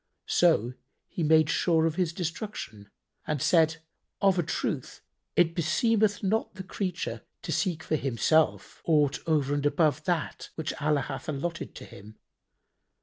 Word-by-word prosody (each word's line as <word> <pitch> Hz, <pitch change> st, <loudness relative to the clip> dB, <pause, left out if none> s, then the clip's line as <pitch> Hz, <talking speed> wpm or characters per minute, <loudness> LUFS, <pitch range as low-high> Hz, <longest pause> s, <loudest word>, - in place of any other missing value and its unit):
So 160 Hz, -9 st, +3 dB, 0.3 s
he -, -, -5 dB
made 155 Hz, -1 st, +5 dB
sure 165 Hz, 0 st, +2 dB
of 165 Hz, -, +1 dB
destruction 170 Hz, -, -4 dB, 0.4 s
and 150 Hz, -2 st, -1 dB
said, 160 Hz, +2 st, +3 dB, 0.4 s
"Of 195 Hz, -2 st, +3 dB
a -, -, +5 dB
truth 160 Hz, -, -3 dB, 0.3 s
it 165 Hz, -1 st, +4 dB
beseemeth 205 Hz, +6 st, +1 dB
not 215 Hz, +3 st, 0 dB
the 190 Hz, -, -7 dB
creature 185 Hz, -1 st, -4 dB, 0.2 s
to -, -, -4 dB
seek 175 Hz, -5 st, -1 dB
for 155 Hz, -, 0 dB
himself 140 Hz, +4 st, +1 dB
aught 150 Hz, -4 st, +3 dB
over 145 Hz, -3 st, +2 dB
and 145 Hz, -1 st, -1 dB
above 155 Hz, 0 st, +2 dB
that 160 Hz, -, -2 dB
which 160 Hz, -1 st, -3 dB
Allah 150 Hz, -1 st, +2 dB
hath -, -, -6 dB
allotted 165 Hz, +4 st, -4 dB
to -, -, -9 dB
him. 105 Hz, +2 st, -13 dB
160 Hz, 145 wpm, -28 LUFS, 145-175 Hz, 0.4 s, made